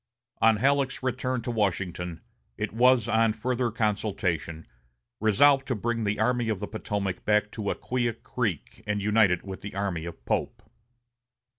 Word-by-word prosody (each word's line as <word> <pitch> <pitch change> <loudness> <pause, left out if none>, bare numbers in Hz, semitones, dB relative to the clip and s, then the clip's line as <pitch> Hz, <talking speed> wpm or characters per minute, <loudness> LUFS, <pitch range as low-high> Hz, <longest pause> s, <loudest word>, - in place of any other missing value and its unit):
On 110 -1 +5
Halleck's 135 +2 +1
return 130 -1 -1
to 120 - -2
Washington, 90 -5 -2 0.4
it - - -3
was, 125 0 +4
on 115 -1 +3
further 125 +2 -1
consultation, 100 -7 -1 0.5
resolved 135 +6 +4
to 130 - 0
bring 115 +1 -1
the 105 0 -1
Army 120 +1 +1
of 105 -4 -1
the 105 - -4
Potomac 100 -4 -3
back 105 0 +2
to 105 -3 -3
Acquia 120 -2 -1
Creek 110 - -4
and 105 0 0
unite 105 0 +4
it 90 0 -1
with 95 -1 -7
the 100 - -7
army 95 -5 -2
of 85 - -9
Pope. - - -2
110 Hz, 155 wpm, -27 LUFS, 100-120 Hz, 0.5 s, On